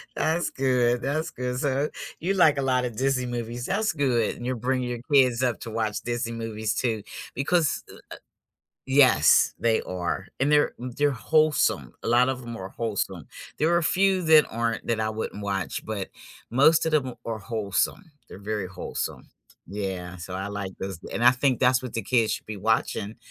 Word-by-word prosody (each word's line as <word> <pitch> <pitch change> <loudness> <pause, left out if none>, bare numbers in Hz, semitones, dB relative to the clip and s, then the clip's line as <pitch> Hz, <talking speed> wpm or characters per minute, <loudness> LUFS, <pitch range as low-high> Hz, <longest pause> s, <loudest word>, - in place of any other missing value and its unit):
That's 165 +2 0
good, 125 -2 +1
that's 155 +5 -1
good, 125 -3 -4
so 140 +1 0 0.3
you 185 +4 0
like 160 -7 +5
a - - +1
lotta 130 -2 +1
Disney 130 +2 0
movies, 120 0 -4
that's 210 +2 0
good 130 -7 +1
and 120 - -8
you're 130 +1 -1
bringing 125 +1 -1
your 120 -1 -3
kids 130 -3 +5
up 125 -3 0
to - - -6
watch 110 -2 -2
Disney 120 -1 -3
movies 110 -1 -3
too, 115 -4 -1 0.3
because, 155 +3 +1
uh - - -12
uh - - -15 0.9
Yes, 130 - +5
they 115 -1 +2
are. 90 +1 -3
And 140 +3 +2
they're 150 0 +4
they're 130 +4 0
wholesome, 155 +4 +1
a - - -4
lot 120 +2 +4
of 130 -1 -3
'em 120 -1 -7
are 95 0 -7
wholesome, 100 - -3 0.3
there 155 - +3
are - - +5
a 170 - 0
few 190 +3 +2
that 160 -2 +6
aren't 115 -1 -2
that 115 -2 0
I 110 - 0
wouldn't 110 -1 -5
watch, 100 -2 -3
but 105 -3 -4 0.4
most 155 +7 +4
of 160 - -1
them 130 -5 +1
are 115 -1 -3
wholesome, 110 - -2 0.2
they're - - -11
very 105 -1 -3
wholesome, 90 - -5 0.4
yeah, 95 -2 -5
so 90 +1 -8
I 95 +2 -3
like 100 -2 -5
those, 95 -3 -5
and 120 - -1
I 120 - +9
think 130 0 +1
that's 125 0 +4
what 125 - -6
the 115 - -1
kids 115 +1 +2
should - - -7
be 105 -1 -5
watching 110 0 0
120 Hz, 190 wpm, -26 LUFS, 110-135 Hz, 0.9 s, I